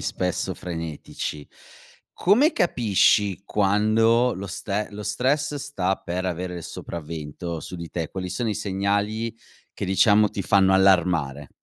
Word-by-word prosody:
spesso 90 -1 -2
frenetici. 80 -3 -6 0.7
Come 245 - +4
capisci 105 - +2
quando 110 +5 +3
lo 100 +2 -6
ste 105 +4 -3
lo 105 0 -7
stress 140 +7 0
sta 135 -10 -1
per 90 +2 -4
avere 90 0 -3
il 85 - -7
sopravvento 80 +1 -6
su 90 - -7
di 85 -1 -7
te? 80 -3 -3
Quali 95 -1 -5
sono 115 +5 -2
i 105 - -1
segnali 100 +4 -1 0.4
che, - - -5
diciamo, 105 +3 +4
ti 100 - -4
fanno 95 -1 +4
allarmare? 85 -8 +2
95 Hz, 135 wpm, -24 LUFS, 90-110 Hz, 0.7 s, Come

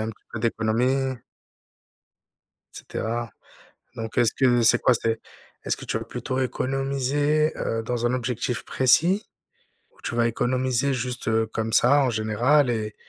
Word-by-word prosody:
un 110 - -2
petit 110 - -18
peu - - -4
d'économies 120 +4 0 1.6
et - - -9
cetera. 115 +1 -4 0.7
Donc, 115 -1 -6
est-ce 120 - +4
que 120 -2 +3
c'est 115 - +5
quoi? 125 - +4
C'est 115 -1 -1 0.4
est-ce - - 0
que - - -10
tu - - -2
vas - - -7
plutôt 130 - -4
économiser, 135 +4 0
heu, 115 0 -2
dans 120 +1 -2
un 120 - +1
objectif 125 -1 -2
précis 165 +11 +3 0.7
ou - - -25
tu - - -3
vas 120 0 +3
économiser, 130 +3 0
juste, 125 0 -4
heu, 110 0 +1
comme 110 0 -2
ça 140 +5 +5
en 130 - +1
général 120 +6 +2
et 110 -3 -2
125 Hz, 155 wpm, -24 LUFS, 115-130 Hz, 1.6 s, c'est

